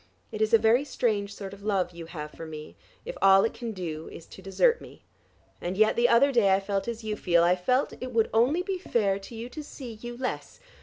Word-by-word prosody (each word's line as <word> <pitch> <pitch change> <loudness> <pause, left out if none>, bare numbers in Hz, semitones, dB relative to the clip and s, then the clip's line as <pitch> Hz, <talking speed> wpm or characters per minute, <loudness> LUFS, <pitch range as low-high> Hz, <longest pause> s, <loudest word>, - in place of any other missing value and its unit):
It 215 - -5
is 215 +1 +2
a 230 - +8
very 225 +4 +3
strange 215 -7 -1
sort 195 -1 -7
of 200 - -12
love 195 -4 0
you 170 -1 -9
have 150 -3 -7
for 165 - -9
me, 155 -1 -9 0.3
if - - -6
all 195 0 +6
it 225 - 0
can 235 -1 -5
do 165 -5 -6
is 165 - -11
to - - -13
desert 465 - +2
me. - - -14 0.6
And 180 +2 -3
yet 215 +1 +4
the 240 0 +3
other 265 +4 +5
day 205 -7 +4
I - - +1
felt 195 +1 -3
as 230 -1 -5
you 215 -1 -2
feel; 170 -4 +2
I 175 +1 +4
felt 250 +9 0
it 255 0 -5
would 225 -2 +2
only 260 +11 +3
be 385 -1 -3
fair 200 - 0
to 200 +4 -11
you 230 +2 -6
to 300 +4 -7
see 260 -5 -9
you 240 0 -7
less. 255 0 -5
215 Hz, 245 wpm, -27 LUFS, 190-240 Hz, 0.6 s, a